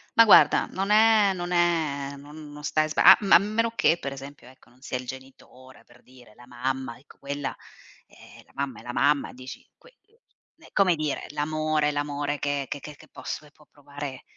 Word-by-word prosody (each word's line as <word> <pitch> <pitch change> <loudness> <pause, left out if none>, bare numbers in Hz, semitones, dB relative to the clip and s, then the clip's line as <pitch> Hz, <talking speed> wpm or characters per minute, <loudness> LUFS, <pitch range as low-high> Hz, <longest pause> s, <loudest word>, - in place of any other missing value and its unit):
ma 230 - +7
guarda, 215 - +6
non 195 +1 -3
è 215 -2 +5
non 175 -1 -5
è 160 -5 0
non 150 +1 -12
non 150 0 -11
stai 155 0 0
sba 155 - 0
a - - +10
m - - -5
ma - - +7
a - - +11
meno 215 +4 -1
che 200 -6 +2
per 140 - -5
esempio, 135 -1 -11
ecco, 130 +1 -20
non 125 +2 -26
sia 130 - -4
il 125 - -8
genitore 130 0 -13
per 120 0 -22
dire, 125 -4 -19
la 120 - -17
mamma, 130 0 -4
ecco 135 +4 -20
quella 140 0 -5 0.5
"Eh, - - -17
è - - -23
la - - -25
mamma 140 -2 -4
è - - -14
la 120 - -7
mamma." 140 +3 +1
Dici. 130 +1 -11
Qui, 485 - -20 0.2
ehm, 455 +3 -28
è - - -21
come 190 -4 +3
dire 155 -2 -3
l'amore. 155 0 -1
L'amore 145 0 -3
che 145 -1 -2
che 145 - -5
che 150 +2 -10 0.2
posso 155 - -7
e 145 - -19
può 150 0 -24
provare 145 -2 -9
145 Hz, 215 wpm, -25 LUFS, 135-160 Hz, 0.5 s, a